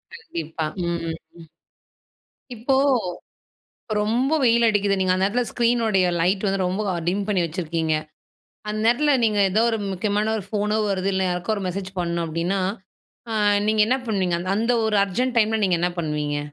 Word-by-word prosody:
கண்டிப்பா. 165 - -5 0.2
ம் 170 0 -1
ஹ்ம் 165 -1 -4 0.3
ம். - - -16 1.1
இப்போ 250 +5 0 1.3
ரொம்ப 240 +7 +1
வெயில் 235 -1 +4
அடிக்குது. 205 -2 +1
நீங்க 185 -1 +2
அந்த 185 +1 +1
நேரத்துல 245 +5 +1
ஸ்க்ரீனுடைய 230 -6 +2
லைட் 190 +4 +1
வந்து 195 -1 0
ரொம்ப 190 +4 -1 0.3
டிம் 195 +3 0
பண்ணி 195 -3 +1
வச்சிருக்கீங்க. 165 -1 -2 0.8
அந்த 215 0 -2
நேரத்துல 285 +6 +3
நீங்க 215 -2 +2
ஏதோ 215 +4 +3
ஒரு 225 - 0
முக்கியமான 210 +3 0
ஒரு 200 - -5
ஃபோனோ 210 0 0
வருது, 195 0 0
இல்லை 190 0 +1
யாருக்கோ 180 +4 -1
ஒரு 200 - -4
மெசேஜ் 190 +1 -4
பண்ணணும் 170 -1 -1
அப்படின்னா, 170 +5 -1 0.7
அ - - -2 0.4
நீங்க 215 0 +2
என்ன 260 +2 +2
பண்ணுவீங்க? 185 -5 0 0.2
அந்த 230 +3 +1
ஒரு 215 - +1
அர்ஜெண்ட் 245 +6 -2
டைம்ல 220 0 +2
நீங்க 180 -3 +2
என்ன 180 - +1
பண்ணுவீங்க? 150 -2 -2
195 Hz, 160 wpm, -23 LUFS, 175-220 Hz, 1.3 s, வெயில்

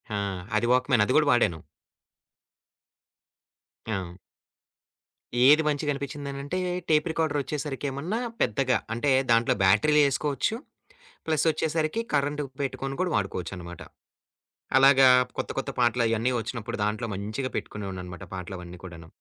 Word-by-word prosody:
ఆ! - - -1 0.4
అది 120 +2 +2
వాక్‌మాన్ 125 -3 +3
అది 130 - 0
గూడా 150 -2 +3
వాడాను. 85 -10 +2 2.3
ఆహ్, - - 0
హ్మ్. 85 - -9 1.4
ఏది 150 +2 +7
మంచిగనిపిచ్చిందనంటే 140 +1 -3 0.3
టేప్ 150 0 +3
రికార్డరొచ్చేసరికి 150 -3 -2
ఏమన్నా 165 - -3 0.2
పెద్దగా 130 +2 +2 0.2
అంటే 135 +4 0 0.2
దాంట్లో 115 +1 +4
బ్యాటరీలేసుకోవచ్చు 140 - +3 0.7
ప్లసొచ్చేసరికి 160 +3 0
కరెంట్ 145 +1 0 0.2
పెట్టుకొని 135 0 -3
గూడా 185 -1 +1
వాడుకోవచ్చన్నమాట. 90 -3 -4 1.0
అలాగా 135 -1 +7 0.3
కొత్త - - -3
కొత్త - - -4
పాటలు 120 0 +3
అయన్నీ 115 +3 +1
వచ్చినప్పుడు 115 0 -5
దాంట్లో 110 +3 -1
మంచిగా 110 +7 -4
పెట్టుకునేవాడినన్నమాట 95 -3 -6
పాటలవన్నీ 90 -1 -7
కూడాను. 85 -3 -10
130 Hz, 105 wpm, -26 LUFS, 105-145 Hz, 2.3 s, ఏది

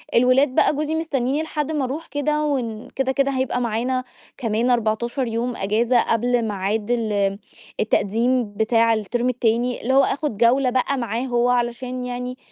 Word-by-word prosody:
الولاد 255 +2 +4
بقى - - +3
جوزي 305 +2 -1
مستنيني 290 -2 -1
لحد 305 -1 -3
ما 295 -3 -1
أروح 285 +6 -4
كده 300 +2 -1
ون 235 -6 -2
كده، 265 0 -1
كده 275 0 +1
هيبقى 260 -1 -1
معانا 245 +3 -1 0.3
كمان 230 0 0
14 235 +2 0
يوم 235 +2 -2
أجازة 230 +5 +2
قبل 240 +2 +1
ميعاد 210 +1 -2
ال 205 -4 0 0.4
التقديم 225 +2 +1
بتاع 225 +2 +3
الترم 235 +4 -1
التاني، 240 0 0
اللي 260 +3 0
هو 275 - +6
آخد 285 -7 -1
جَولة 250 +3 +3
بقى 260 +2 0
معاه 235 -1 -2
هُو 245 -1 +1
علشان 250 +1 -1
يعني، 250 +1 -5
245 Hz, 160 wpm, -22 LUFS, 230-260 Hz, 0.4 s, هو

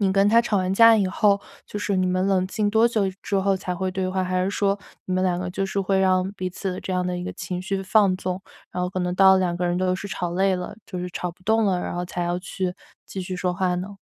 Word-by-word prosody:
你 195 -2 +2
跟 195 +1 +4
她 230 +2 +6
吵 225 -3 0
完 185 0 0
架 230 +2 +8
以 200 -3 +2
后， 200 +2 +2 0.3
就 210 - -5
是 205 -1 -1
你 185 0 +2
们 185 +1 +1
冷 190 -2 +2
静 205 +2 -1
多 225 +2 +4
久 225 -3 0 0.2
之 200 - -1
后 195 0 +2
才 180 -1 -4
会 185 +1 -2
对 185 0 -2
话？ 185 0 -1
还 185 0 0
是 185 - 0
说 200 -1 +1 0.3
你 185 - -3
们 185 - +1
两 180 -2 +1
个 180 0 -3
就 195 +2 -2
是 195 +1 -3
会 195 0 +1
让 185 0 +2
彼 185 -2 -4
此 190 +1 -4
的 180 - -6
这 - - -6
样 180 0 0
的 180 - -2
一 - - -5
个 - - -4
情 180 -1 -4
绪 195 +1 -2
放 195 -1 +3
纵， 185 0 -3 0.3
然 180 - -2
后 180 - 0
可 185 - -3
能 180 0 -1
到 190 0 +7
了 - - +3
两 180 -2 0
个 180 - -1
人 175 0 0
都 185 0 +1
是 200 +2 -6
吵 175 -3 -3
累 190 +1 +2
了， 180 +3 -6
就 180 - -6
是 180 0 -3
吵 180 0 -3
不 175 +2 -22
动 220 +2 +3
了， 185 -2 +2
然 - - -4
后 175 - -2
才 175 0 -4
要 175 +1 -1
去 185 0 -3 0.3
继 190 - -6
续 185 0 -5
说 180 0 -1
话 180 -1 0
呢？ 195 +3 -6
185 Hz, 320 characters per minute, -24 LUFS, 180-195 Hz, 0.3 s, 架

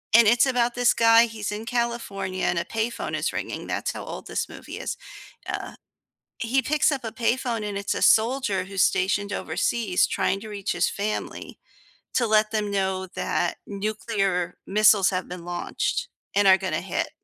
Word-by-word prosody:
and 230 -1 +8
it's 235 +3 +5
about 245 -2 +1
this 245 0 +4
guy, 230 0 +6
he's 220 -3 -5
in 210 +2 -5
California, 230 -6 -2
and 175 - +1
a - - -1
payphone 225 +1 -2
is - - -1
ringing, - - -4
that's - - -2
how - - -7
old - - -7
this - - -2
movie - - -9
is. - - -4 0.5
Uh - - -4 0.7
he 250 +3 +1
picks 300 +6 +2
up 275 -4 -3
a 225 - -4
payphone, 240 -1 0
and 200 -1 -3
it's 200 - -2
a - - -3
soldier 225 -4 +3
who's 195 0 0
stationed 200 +2 +1
overseas 205 -2 0
trying 195 - 0
to 220 - -9
reach 205 -2 -3
his 175 +1 +1
family, 210 +1 -4 0.6
to 245 - +2
let 215 0 +3
them 210 -2 -1
know 190 -1 -1
that 175 - -1
nuclear 195 -3 -1
missiles 205 -1 +5
have 185 -1 -2
been 180 -1 -8
launched 175 - -2 0.3
and 205 0 +4
are 190 0 +8
gonna 190 0 -2
hit. - - -2
215 Hz, 180 wpm, -25 LUFS, 195-235 Hz, 0.7 s, and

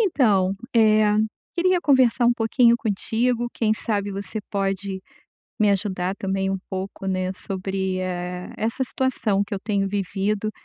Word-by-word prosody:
Então, 210 - +3 0.2
eh, 215 -2 +5 0.4
queria 360 +1 +2
conversar 260 -5 +4
um 240 - +5
pouquinho 235 +1 +3
contigo, 235 +3 0
quem 220 -2 +1
sabe 205 -2 -2
você 200 +2 -4
pode 195 -1 -2 0.6
me 210 -1 +4
ajudar 190 -2 -1
também 195 -1 -1
um 195 - -1
pouco, 190 0 -5
né, 185 -1 -1
sobre, 190 0 -2
eh, 180 0 -4
essa 230 +4 -1
situação 230 -6 0
que 200 - -5
eu 195 - -4
tenho 200 -2 0
vivido, 200 +2 -1
200 Hz, 140 wpm, -23 LUFS, 190-230 Hz, 0.6 s, eh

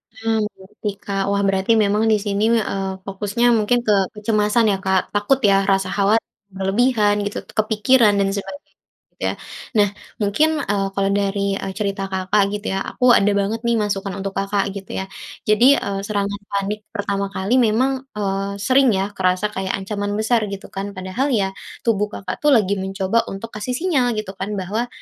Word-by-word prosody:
Mmm, 225 0 0 0.2
oke 210 +2 -5
Kak, 195 -1 -2
wah 200 - +1
berarti 195 +2 +1
memang 205 +2 +1
di - - +5
sini, 205 +1 0
eee, 195 -3 -1
fokusnya 200 +4 -1
mungkin 225 +3 +2
ke - - +4 0.2
kecemasan 210 +1 +2
ya 195 - 0
Kak? 190 -1 +1
Takut 205 +6 +2
ya 200 -1 +5
rasa 195 -1 +2
khawatir 200 +3 +2 0.3
berlebihan 205 +2 +2
gitu, 205 - -5
kepikiran 215 +1 +4
dan 195 -1 +1
sebagai 245 +9 -6 0.4
gitu - - -12
ya? - - 0 0.4
Nah 205 -2 +4 0.3
mungkin, 300 +10 +2
eee, 200 -1 0
kalau 195 0 +1
dari, 200 0 0
eee, 190 - -5
cerita 195 -2 -2
Kakak 190 +2 +1
gitu 210 +1 -4
ya 195 - -1
aku 250 -1 +3
ada 205 -2 +4
banget 200 +3 0
nih 235 - +3
masukan 195 -1 -2
untuk 195 0 -3
Kakak 195 0 -1
gitu 195 -1 -7
ya. 190 - -2 0.4
Jadi, 240 +6 +6
eee, 195 -1 -3
serangan 205 -1 -2
panik 200 +1 -1 0.2
pertama 200 -1 -1
kali 195 +5 -1
memang, 240 +3 +3 0.3
eee, 195 -1 -1
sering 265 +2 +4
ya 195 +2 -1
kerasa 185 +2 0
kayak 190 0 -2
ancaman 205 +1 -3
besar 220 +2 +2
gitu 195 0 -8
kan. 200 +1 -5
Padahal 190 +9 -2
ya 195 -3 +1 0.3
tubuh 210 -3 +1
Kakak 190 -3 -6
tuh 295 -2 +5
lagi 200 -4 +2
mencoba 195 +4 0
untuk 210 +4 -7
kasih 215 +4 -3
sinyal 260 -7 +1
gitu 215 -3 -4
kan 205 +2 -3
bahwa, 205 +5 -2
205 Hz, 180 wpm, -21 LUFS, 195-220 Hz, 0.4 s, Jadi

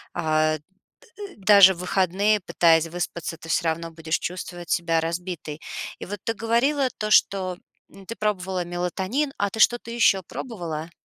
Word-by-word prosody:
э, 155 -1 +1 0.4
д 415 -5 -11
даже 195 -1 +7
в - - -15
выходные, 190 +3 +1
пытаясь 165 -3 +3
выспаться, 170 -1 -4
ты 165 - -13
всё 170 - +1
равно 165 +1 -2
будешь 160 0 -2
чувствовать 175 -1 -6
себя 165 -1 +1
разбитой. 165 -2 -5 0.4
И - - -7
вот 205 +1 -6
ты 225 - 0
говорила 250 +6 +1
то, 215 0 -2
что 185 -3 +3 0.5
ты 230 - -5
пробовала 190 -3 -1
мелатонин, 185 - -2
а 200 0 -1
ты 220 - -7
что-то 240 0 +3
еще 230 -5 +3
пробовала? 170 -6 -6
180 Hz, 150 wpm, -24 LUFS, 165-215 Hz, 0.5 s, даже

